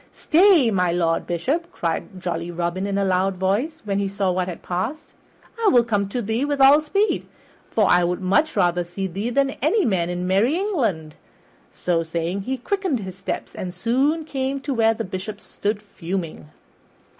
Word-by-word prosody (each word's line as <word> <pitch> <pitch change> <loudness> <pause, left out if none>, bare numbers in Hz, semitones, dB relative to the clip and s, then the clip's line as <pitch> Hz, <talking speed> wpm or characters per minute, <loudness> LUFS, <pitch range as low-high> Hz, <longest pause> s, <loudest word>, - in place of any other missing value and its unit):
"Stay, 330 - +5
my 180 -3 +2
Lord 170 -1 0
Bishop," 290 - -1
cried 175 - -3
jolly 170 -1 -3
Robin 175 +3 -2
in 200 0 -1
a 200 - +1
loud 190 +1 +1
voice, 205 - -1
when 200 -1 0
he 200 - 0
saw 195 -1 0
what 180 0 -1
had 180 - -7
passed, 215 - -4 0.5
"I - - +4
will 245 -9 +6
come 205 -4 -1
to 240 +3 -2
thee 220 +5 -1
with 290 -1 -1
all 275 +3 +7
speed, 395 +8 0 0.4
for 215 - +2
I 175 0 +4
would 180 +2 -1 0.3
rather 175 -3 +2
see 175 +3 -5
thee 195 +5 -3
than 275 +2 +2
any 365 - +2
man 180 -7 +1
in 180 0 -3
merry 200 - +2
England." 230 - -1 0.6
So 175 -2 0
saying, 170 +3 -2
he 260 +6 -3
quickened 365 - -1
his 190 -2 -7
steps 195 0 -5
and 180 -1 -6
soon 270 - +1
came 270 -2 -2
to 275 0 -2
where 225 -2 +3
the - - -3
Bishop 185 +3 -6
stood 210 0 -3
fuming. 170 -5 -5
200 Hz, 180 wpm, -22 LUFS, 180-270 Hz, 0.6 s, all